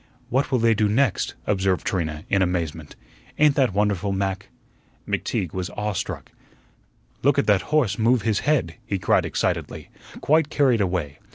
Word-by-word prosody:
"What 130 +4 +1
will 130 - +3
they 115 -1 +3
do 105 -1 +1
next?" 125 +1 +1
observed 95 -5 0
Trina, 80 -5 -2
in 100 - +2
amazement. 85 -4 -2 0.4
"Ain't 150 -1 +5
that 130 -5 +2
wonderful, 100 -1 0
Mac?" 95 0 -2 0.6
McTeague 90 -5 -2
was 90 -1 -3
awe 105 0 -1
struck. - - -5 0.9
"Look - - +3
at - - +2
that 105 -3 +3
horse 150 -11 +1
move 115 0 +3
his 110 -2 +1
head," 130 - 0
he 100 - -2
cried - - +2
excitedly, - - -2 0.3
quite 155 0 +2
carried 130 -7 +2
away. 85 -7 -2
100 Hz, 160 wpm, -23 LUFS, 90-125 Hz, 0.9 s, Ain't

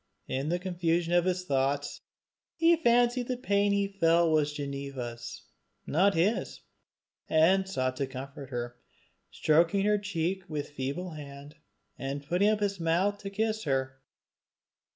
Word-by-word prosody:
In 135 +3 -2
the 175 - +1
confusion 175 -2 -1
of 175 0 +4
his 185 0 -1
thoughts 140 0 -1 0.5
he 335 +1 +5
fancied 245 -4 +2
the 255 - -2
pain 205 -4 +1
he 200 0 +1
felt 170 -4 +3
was 150 -1 +2
Ginevra's, 140 -4 -6 0.4
not 190 +6 +3
his, 190 +8 0 0.7
and 185 +5 +4
sought 130 -6 -1
to 140 - -1
comfort 135 +1 -8
her, 120 -1 -5 0.5
stroking 170 +5 +2
her 210 0 +3
cheek 190 -2 -2
with 150 -2 -4
feeble 145 +6 -4
hand, 145 -1 -10 0.5
and 140 +1 -4
putting 180 +7 +2
up 215 -1 +1
his 200 -2 -1
mouth 180 +5 +1
to 200 - -6
kiss 220 +1 -1
her. 130 -1 -1
165 Hz, 140 wpm, -29 LUFS, 140-200 Hz, 0.7 s, he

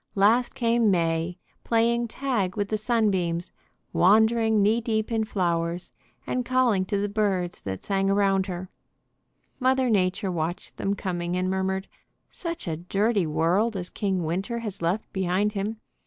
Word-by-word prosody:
Last 220 +5 +3
came 235 -2 +2
May, 165 -1 0 0.3
playing 235 +1 +2
tag 225 -6 -2
with 205 -1 -1
the 215 - 0
sunbeams, 195 -7 0 0.4
wandering 220 +4 +4
knee 220 +3 +3
deep 220 -1 -1
in 225 -1 +1
flowers, 175 -3 -1 0.3
and 250 - -1
calling 245 -6 +2
to 200 +1 -1
the 205 +1 0
birds 195 -4 -1
that 95 -1 -5
sang 195 -1 0
around 195 -1 +2
her: 180 0 -6 0.9
Mother 260 -1 +2
Nature 190 -1 +1
watched 170 0 -4
them 195 +1 -1
coming 175 -2 -3
and 185 +1 0
murmured, 190 0 -1 0.4
"Such 335 - -5
a 160 -2 -2
dirty 195 +2 +1
world 185 +8 +1
as 180 -1 -6
King 190 -4 -1
Winter 190 +9 -2
has 210 -6 -5
left 175 +6 -1
behind 190 +2 +1
him! 210 +2 -3
195 Hz, 150 wpm, -26 LUFS, 180-220 Hz, 0.9 s, wandering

